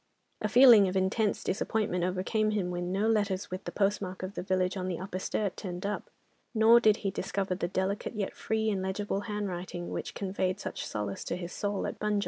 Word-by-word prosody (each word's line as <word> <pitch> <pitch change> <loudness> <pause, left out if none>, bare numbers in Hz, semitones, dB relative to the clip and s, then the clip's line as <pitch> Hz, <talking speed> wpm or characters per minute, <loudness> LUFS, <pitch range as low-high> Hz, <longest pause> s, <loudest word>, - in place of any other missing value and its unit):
A - - 0
feeling 240 -6 +8
of 185 +1 -1
intense 200 +3 +1
disappointment 195 -2 0
overcame 190 +4 0
him 200 -4 -1
when 175 0 -3
no 200 +3 +1
letters 205 -4 0
with 185 +1 -5
the - - -4
postmark 195 -2 -1
of 185 +1 -4
the - - -4
village 185 0 0
on 185 -1 -3
the 180 -2 -2
Upper 185 0 -5
Sturt 200 0 -1
turned 180 -1 -5
up, 205 +1 -3 0.5
nor 225 +2 +7
did 215 -2 +4
he 195 - +2
discover 195 -1 -2
the 180 -1 -2
delicate, 190 +5 -2
yet 205 -2 -2
free 220 0 0
and 195 -2 -1
legible 195 +1 -2
handwriting, 180 -4 -4
which - - -4
conveyed 190 -1 -1
such - - -5
solace 105 -2 -4
to - - -2
his 175 -1 -6
soul 205 -1 -2
at - - -5
Bunjil. 210 -1 +1
195 Hz, 205 wpm, -30 LUFS, 185-210 Hz, 0.5 s, feeling